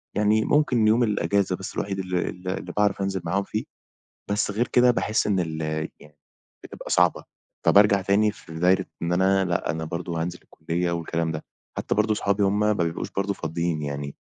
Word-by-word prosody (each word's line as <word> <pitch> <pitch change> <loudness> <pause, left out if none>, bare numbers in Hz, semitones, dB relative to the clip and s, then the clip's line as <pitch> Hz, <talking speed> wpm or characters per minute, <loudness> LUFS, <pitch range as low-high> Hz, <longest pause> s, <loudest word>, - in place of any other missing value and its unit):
يعني 105 +1 +3
ممكن 125 -7 +3
يوم 115 +3 +4
الإجازة 100 -2 +1
بس، 95 - -8
الوحيد 95 -1 -2
اللي 90 -1 -1
اللي 90 0 -5
باعرف 100 -1 +2
أنزِل 95 -2 -1
معاهم 95 +4 0
فيه، 105 +2 -3 0.7
بس 105 0 +1
غير 115 +4 0
كده 125 0 +5
باحِس 110 -3 +1
إن 95 -3 +1
ال 80 -2 -3 0.4
يعني 75 0 -18 0.5
بتبقى - - -9
صعبة. - - +3 0.4
فبارجع 100 -1 +5
تاني 105 +3 +3
في 80 -5 -13
دايِرة 90 +2 +3 0.2
إن 85 +1 0
أنا، 95 +1 +3
لأ، 85 -4 -1
أنا 80 +1 -3
برضه 85 0 -3
هانزِل 90 +1 -4
الكُلّية 85 +2 -3
والكلام 85 -1 -2
ده. 75 - -6 0.3
حتى - - -1
برضه 105 0 +2
صُحابي 100 0 0
هُم 100 +1 +2
ما 105 0 +3
بيبقوش 85 -4 -2
برضه 100 +1 -1
فاضيين 80 -1 -2
يعني 70 -1 -5
95 Hz, 180 wpm, -25 LUFS, 85-105 Hz, 0.7 s, كده